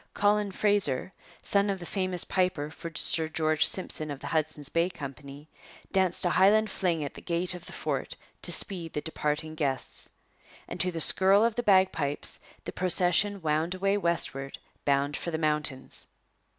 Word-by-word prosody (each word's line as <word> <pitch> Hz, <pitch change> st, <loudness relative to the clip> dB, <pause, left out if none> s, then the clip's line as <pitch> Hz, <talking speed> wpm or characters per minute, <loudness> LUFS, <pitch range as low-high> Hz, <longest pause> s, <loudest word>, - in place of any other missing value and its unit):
Colin 205 Hz, 0 st, +2 dB
Fraser, 190 Hz, -6 st, +1 dB, 0.3 s
son 200 Hz, 0 st, +1 dB
of 195 Hz, -, -1 dB
the 175 Hz, -, -8 dB
famous 185 Hz, -1 st, 0 dB
piper 180 Hz, -5 st, -1 dB
for 165 Hz, +1 st, -8 dB
Sir 160 Hz, +1 st, +3 dB
George 155 Hz, -1 st, +2 dB
Simpson 155 Hz, -4 st, -4 dB
of 140 Hz, -2 st, -5 dB
the -, -, -10 dB
Hudson's 155 Hz, -2 st, -1 dB
Bay 170 Hz, +4 st, +1 dB
Company, 140 Hz, -2 st, -9 dB, 0.4 s
danced 185 Hz, -2 st, +1 dB
a 175 Hz, -, +2 dB
Highland 210 Hz, +4 st, +4 dB
fling 170 Hz, -5 st, -1 dB
at 140 Hz, -, -5 dB
the -, -, -11 dB
gate 175 Hz, +1 st, -1 dB
of 180 Hz, 0 st, -10 dB
the -, -, -9 dB
fort -, -, -4 dB, 0.3 s
to -, -, +2 dB
speed 170 Hz, -5 st, 0 dB
the 150 Hz, -, -2 dB
departing 155 Hz, 0 st, -3 dB
guests. 140 Hz, -5 st, -1 dB, 0.6 s
And -, -, -7 dB
to 180 Hz, -, +2 dB
the 165 Hz, -, -5 dB
skirl 195 Hz, +6 st, +6 dB
of 230 Hz, -, +1 dB
the 240 Hz, -, -2 dB
bagpipes 185 Hz, -9 st, +2 dB, 0.3 s
the -, -, -4 dB
procession 185 Hz, +2 st, +2 dB
wound 160 Hz, +3 st, 0 dB
away 195 Hz, +2 st, +1 dB
westward 165 Hz, -7 st, -1 dB, 0.3 s
bound 140 Hz, +1 st, +1 dB
for -, -, -4 dB
the 160 Hz, -, -2 dB
mountains. 150 Hz, -4 st, -1 dB
170 Hz, 170 wpm, -28 LUFS, 150-190 Hz, 0.6 s, skirl